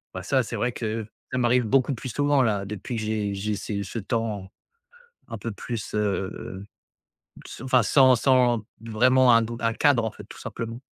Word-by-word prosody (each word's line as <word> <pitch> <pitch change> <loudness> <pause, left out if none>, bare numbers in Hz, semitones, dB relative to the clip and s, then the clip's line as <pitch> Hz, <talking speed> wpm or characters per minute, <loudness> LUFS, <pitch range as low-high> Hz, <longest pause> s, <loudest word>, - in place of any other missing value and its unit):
bah, - - -5
ça - - +2
c'est - - -6
vrai 125 - 0
que 110 -1 -3 0.3
ça 130 - -1
m'arrive 125 0 +3
beaucoup 135 +4 +2
plus 130 +2 -6
souvent 145 +1 +2
là 105 -5 +1
depuis, 105 +4 -5
que 110 - -2
j'ai 105 -2 -1
j'ai 105 +2 -2
ces 100 0 -4
ce 105 +5 -5
temps 105 -2 -3 0.8
un 115 - -6
peu 115 +3 -5
plus, 110 +1 -6
heu, 105 - +1 0.3
heu, 95 +2 -8 0.8
ce - - -9
enfin 130 -3 +3
sans 130 +2 +5
sans 125 -2 +3 0.2
vraiment 125 +3 +4
un 115 - +5
don 115 +1 -4
un 115 -1 0
cadre 130 -4 +3
en 110 - -2
fait, - - -12
tout - - -13
simplement. 115 +1 -6
115 Hz, 200 wpm, -25 LUFS, 105-125 Hz, 0.8 s, sans